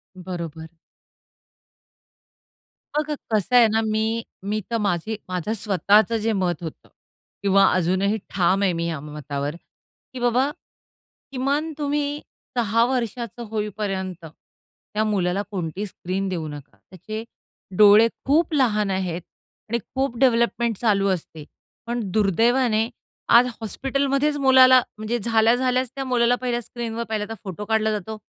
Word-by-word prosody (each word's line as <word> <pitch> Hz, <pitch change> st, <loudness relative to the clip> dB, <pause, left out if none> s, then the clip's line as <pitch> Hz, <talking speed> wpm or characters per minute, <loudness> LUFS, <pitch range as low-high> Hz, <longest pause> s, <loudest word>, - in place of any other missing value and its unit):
बरोबर. 170 Hz, -3 st, -6 dB, 2.3 s
बघा 300 Hz, 0 st, 0 dB, 0.2 s
कसं 215 Hz, +4 st, +1 dB
आहे 235 Hz, -2 st, +8 dB
ना 220 Hz, +1 st, +1 dB
मी 215 Hz, 0 st, 0 dB, 0.5 s
मी 215 Hz, +1 st, 0 dB
तर 230 Hz, -, +1 dB
माझी 200 Hz, +2 st, -1 dB
माझं 185 Hz, +4 st, -2 dB
स्वतःच 210 Hz, +1 st, +3 dB
जे 225 Hz, 0 st, +1 dB
मत 175 Hz, -4 st, -1 dB
होतं 160 Hz, -, -8 dB, 0.5 s
किंवा 195 Hz, 0 st, +5 dB
अजूनही 185 Hz, +4 st, +1 dB
ठाम 190 Hz, +1 st, +2 dB
आहे 185 Hz, -3 st, +2 dB
मी 170 Hz, 0 st, -2 dB
या 160 Hz, -4 st, -3 dB
मतावर, 150 Hz, 0 st, -5 dB, 0.6 s
की 255 Hz, -, -6 dB
बाबा 245 Hz, +3 st, +2 dB, 0.8 s
किमान 280 Hz, +4 st, -1 dB
तुम्ही 290 Hz, 0 st, -1 dB, 0.4 s
6 230 Hz, 0 st, +3 dB
वर्षाचं 240 Hz, -2 st, -3 dB
होईपर्यंत, 195 Hz, -5 st, -3 dB
त्या 210 Hz, +6 st, -8 dB
मुलाला 195 Hz, -2 st, 0 dB
कोणती 185 Hz, +2 st, -3 dB
स्क्रीन 195 Hz, 0 st, -4 dB
देऊ 165 Hz, -4 st, -3 dB
नका. 145 Hz, -1 st, -10 dB
त्याचे 215 Hz, +5 st, -7 dB, 0.5 s
डोळे 210 Hz, +2 st, +8 dB, 0.2 s
खूप 315 Hz, +4 st, +2 dB
लहान 215 Hz, -8 st, +2 dB
आहेत 180 Hz, -2 st, -2 dB, 0.5 s
आणि 235 Hz, +1 st, 0 dB, 0.2 s
खूप 265 Hz, -3 st, -1 dB
डेव्हलपमेंट 235 Hz, -3 st, +2 dB
चालू 200 Hz, -4 st, +2 dB
असते, 160 Hz, -4 st, -4 dB, 0.4 s
पण 240 Hz, 0 st, -2 dB
दुर्दैवाने 225 Hz, +3 st, +2 dB, 0.5 s
आज 245 Hz, +1 st, +7 dB
हॉस्पिटलमध्येच 275 Hz, +5 st, 0 dB
मुलाला 260 Hz, -2 st, +7 dB, 0.2 s
म्हणजे 215 Hz, +3 st, -2 dB
झाल्या-झाल्याच 245 Hz, +3 st, +2 dB
त्या 270 Hz, -, -3 dB
मुलाला 245 Hz, -1 st, +3 dB
पहिल्या 240 Hz, -1 st, -1 dB
स्क्रीनवर 235 Hz, 0 st, -5 dB
पाहिला 215 Hz, -1 st, -1 dB
तर -, -, -4 dB
फोटो 200 Hz, +1 st, -6 dB
काढला 220 Hz, 0 st, +1 dB
जातो, 215 Hz, +1 st, -4 dB
215 Hz, 125 wpm, -23 LUFS, 190-245 Hz, 2.3 s, आहे